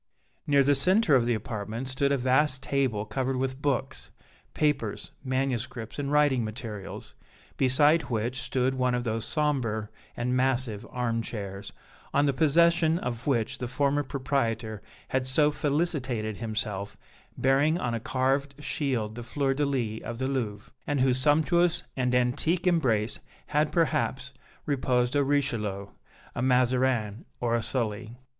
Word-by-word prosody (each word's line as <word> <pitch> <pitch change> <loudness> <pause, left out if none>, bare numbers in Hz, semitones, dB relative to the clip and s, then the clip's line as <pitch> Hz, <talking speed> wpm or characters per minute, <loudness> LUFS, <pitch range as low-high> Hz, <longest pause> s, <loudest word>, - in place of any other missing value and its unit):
Near 140 -1 +5
the 145 +2 +4
centre 185 +3 +6
of 120 -3 +4
the 120 - +2
apartment 110 +3 -5
stood 140 +2 0
a 140 - +3
vast 130 +1 +2
table 130 -7 0
covered 130 +5 -2
with 130 +1 -2
books, 135 -2 -2 0.5
papers, 140 -8 -1
manuscripts 130 -3 -2
and 140 0 -2
writing 145 -4 +3
materials, 110 -2 -7 0.4
beside 145 +5 +3
which 120 +2 -2
stood 130 0 0
one 125 -1 +1
of 125 - -1
those 115 -1 -2
sombre 125 -9 -1 0.3
and 125 +1 0
massive 130 -5 0
arm 120 -2 -1
chairs, 100 -3 -6 0.4
on 145 +1 +4
the 140 - +2
possession 165 +3 +3
of 120 -5 -5
which 120 -6 0
the 125 - -3
former 140 +3 +1
proprietor 120 -6 -2 0.3
had 130 -1 0
so 150 +3 +3
felicitated 135 - -1
himself, 105 -3 -4 0.4
bearing 140 +5 +3
on 120 -7 -2
a 115 - -1
carved 135 +3 0
shield 125 -10 -2
the 120 - -7
fleur 135 +3 -1
de 145 +1 0
lis 115 -6 -2
of 120 - -5
the 130 +2 -1
Louvre, 110 -6 -3 0.2
and 145 -1 0
in - - +4
whose 130 -1 +2
sumptuous 160 +5 +3
and 125 -1 0
antique 145 +9 +1
embrace 125 - +1 0.3
had, 150 +1 +1
perhaps, 140 -5 0 0.3
reposed 130 -2 +1
a 145 - +4
Richelieu, 115 -9 -1 0.4
a - - -3
Mazarin 125 -4 +1 0.2
or 120 -1 0
a 120 - +2
Sully. 115 -1 -3
130 Hz, 150 wpm, -27 LUFS, 115-140 Hz, 0.5 s, centre